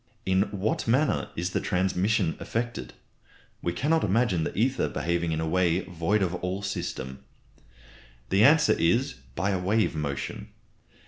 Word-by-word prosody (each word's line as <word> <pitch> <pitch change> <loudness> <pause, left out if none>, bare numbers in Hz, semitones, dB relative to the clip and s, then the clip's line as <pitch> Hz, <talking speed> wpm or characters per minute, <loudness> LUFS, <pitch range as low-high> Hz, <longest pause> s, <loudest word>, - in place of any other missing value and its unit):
In 95 +2 +2
what 100 +3 -2
manner 135 +6 +2
is 90 +2 -2
the - - 0
transmission 95 0 +1
effected? 120 +1 -4 0.7
We 85 - -1
cannot 155 - +1
imagine 100 -4 +2
the - - -4
ether 130 +4 +1
behaving 85 0 -1
in 80 - -1
a 80 - -1
way 90 +1 +2
void 90 +4 0
of 90 -1 -1
all 90 +3 -3
system. 65 -9 -4 1.1
The 100 +3 +4
answer 150 +4 +6
is, 120 +12 +2 0.2
by 100 - 0
a 95 - 0
wave 105 +4 +1
motion. 70 -3 -4
95 Hz, 145 wpm, -27 LUFS, 85-110 Hz, 1.1 s, answer